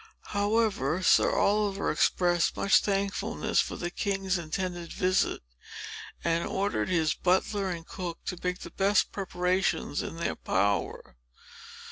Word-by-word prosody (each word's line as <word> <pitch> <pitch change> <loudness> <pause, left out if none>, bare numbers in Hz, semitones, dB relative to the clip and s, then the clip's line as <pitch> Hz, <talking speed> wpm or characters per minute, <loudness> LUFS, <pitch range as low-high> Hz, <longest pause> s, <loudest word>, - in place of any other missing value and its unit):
However, 205 - +1
Sir - - +5
Oliver 205 -1 +1
expressed 175 +2 +2
much 200 - +5
thankfulness 200 -1 0
for - - -4
the 175 0 -4
king's 195 -1 -1
intended 175 +1 -4
visit, 185 - +1 0.8
and 170 0 +1
ordered 200 0 -1
his 160 -3 +2
butler 190 +2 +1
and 170 -2 -5
cook 175 -3 -5
to 180 - -3
make 180 0 -2
the 170 - -8
best 195 +2 +2
preparations 185 -4 -1
in - - -6
their 170 - -2
power. 100 -9 -1
185 Hz, 125 wpm, -28 LUFS, 170-195 Hz, 0.8 s, Sir